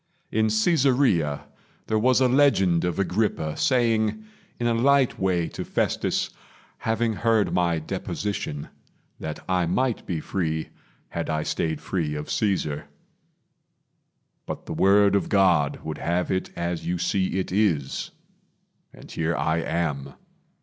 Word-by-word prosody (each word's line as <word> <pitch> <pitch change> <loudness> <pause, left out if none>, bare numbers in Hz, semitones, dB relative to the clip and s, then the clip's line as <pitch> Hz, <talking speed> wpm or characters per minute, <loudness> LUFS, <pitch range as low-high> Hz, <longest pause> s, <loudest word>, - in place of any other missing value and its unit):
In 110 0 +2
Caesarea 115 - +2 0.4
There 110 -1 +1
was 130 +3 +3
a 130 - +5
legend 120 -11 +3
of 90 - -1
Agrippa 95 -5 0
saying 120 - +1 0.3
In 120 - -1
a 120 - +3
light 135 +2 +3
way 90 -3 +1
to - - -5
Festus, - - -1 0.5
having 115 0 0
heard 110 -1 +1
My 85 -2 +2
deposition, 80 -2 -4 0.5
that 80 -1 -6
I 90 -2 +1
might 125 +7 0
be 85 -4 -2
free, 80 -2 -2 0.4
Had - - -4
I 80 0 0
stayed 80 -2 -2
free 80 -3 -2
of 75 0 -5
Caesar; 90 -8 0 1.6
but - - -6
the - - -5
word 100 +1 +4
Of 100 - 0
God 90 -8 +3
would 80 -1 -5
have 85 +2 -1
it 95 - -1
as 85 0 -3
you 90 +1 -1
see 95 +1 0
it 95 - -2
is 90 -9 0 0.8
And - - -14
here 80 +1 -1
I 80 +1 +1
am. 75 -5 -2
95 Hz, 135 wpm, -25 LUFS, 80-110 Hz, 1.6 s, a